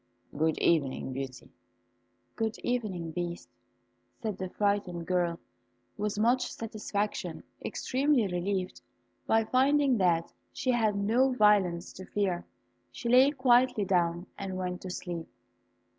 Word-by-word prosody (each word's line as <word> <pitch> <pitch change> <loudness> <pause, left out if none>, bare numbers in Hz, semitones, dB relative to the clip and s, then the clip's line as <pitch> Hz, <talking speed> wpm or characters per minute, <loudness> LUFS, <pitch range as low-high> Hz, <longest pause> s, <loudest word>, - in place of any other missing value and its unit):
"Good 160 +2 +1
evening, 140 -5 +1
Beauty." 130 -1 -6 0.8
"Good 225 0 -2
evening, 200 -9 -2
Beast," 175 +1 -4 0.7
said 215 -5 -4
the 185 -1 -3
frightened 195 -4 -1
girl, 175 -2 0 0.6
with 210 0 -2
much 245 +4 +2
satisfaction. 210 -2 -3 0.2
Extremely 265 -2 +1
relieved 185 0 -2 0.5
by 225 0 +4
finding 270 0 +3
that 170 -3 +2 0.2
she 255 - -1
had 220 -4 +2
no 225 +7 +3
violence 200 -6 +3
to 185 - -9
fear, 185 -4 -1 0.4
she 235 - -4
lay 255 +3 +7
quietly 250 -5 +3
down 175 -1 +1
and 190 -1 -4
went 180 -1 -3
to 185 - -6
sleep. 175 -2 -5
200 Hz, 120 wpm, -30 LUFS, 175-235 Hz, 0.8 s, lay